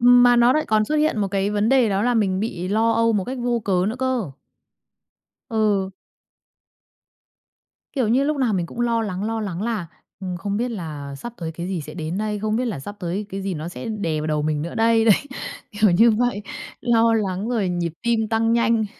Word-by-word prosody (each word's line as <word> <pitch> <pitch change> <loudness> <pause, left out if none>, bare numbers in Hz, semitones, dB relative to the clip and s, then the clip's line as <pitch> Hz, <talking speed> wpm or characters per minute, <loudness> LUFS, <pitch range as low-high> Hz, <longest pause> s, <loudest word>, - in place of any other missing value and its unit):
Ừm. 245 +1 +7
Mà 245 0 +6
nó 240 +1 +5
lại 310 - 0
còn 215 0 +3
xuất 305 - -2
hiện 300 -6 +2
một 200 -2 0
cái 195 +1 0
vấn 210 +1 +1
đề 255 -3 +4
đó 195 +1 0
là 245 0 +2
mình 195 -4 +1
bị 185 -5 -3
lo 225 +3 +2
âu 230 0 +3
một 200 -4 0
cách 260 0 -5
vô 240 -1 0
cớ 185 -3 +2
nữa 230 - -3
cơ. 255 - -1 1.2
Ừ. 210 -5 +1 2.0
Kiểu 255 -7 0
như, 260 +4 +3
lúc 300 0 0
nào 250 -5 +1
mình 175 -3 0
cũng 240 - -7
lo 230 -1 +1
lắng, 195 -1 -3
lo 225 0 -2
lắng 195 -3 -4
là, 220 -6 -2 0.3
ừm, 185 -2 -4
không 200 +4 -3
biết 245 +3 -1
là 150 -9 -6
sắp 185 - -7
tới 165 -2 -5
cái 170 +2 -5
gì 185 -4 -2
sẽ 155 +2 -9
đến 165 +2 -4
đây? 210 -1 -2
Không 215 +1 -1
biết 250 - 0
là 215 - -3
sắp 205 +9 -8
tới 185 +4 -3
cái 195 -1 -5
gì 195 -1 -2
nó 155 +1 -5
sẽ 175 - -7
đè 170 -8 -2
vào 155 - -3
đầu 150 -1 0
mình 150 -1 -1
nữa 170 - -5
đây? 225 0 +3
Đấy. 220 -3 +7 0.6
Kiểu 210 -1 +3
như 225 +7 +6
vậy. 225 -1 0 0.4
Lo 230 -1 +3
lắng 200 -1 -1
rồi 225 -6 0
nhịp 175 -2 -2
tim 230 -2 +1
tăng 225 +1 +2
nhanh. 230 -1 +2
215 Hz, 225 wpm, -22 LUFS, 185-230 Hz, 2.0 s, Ừm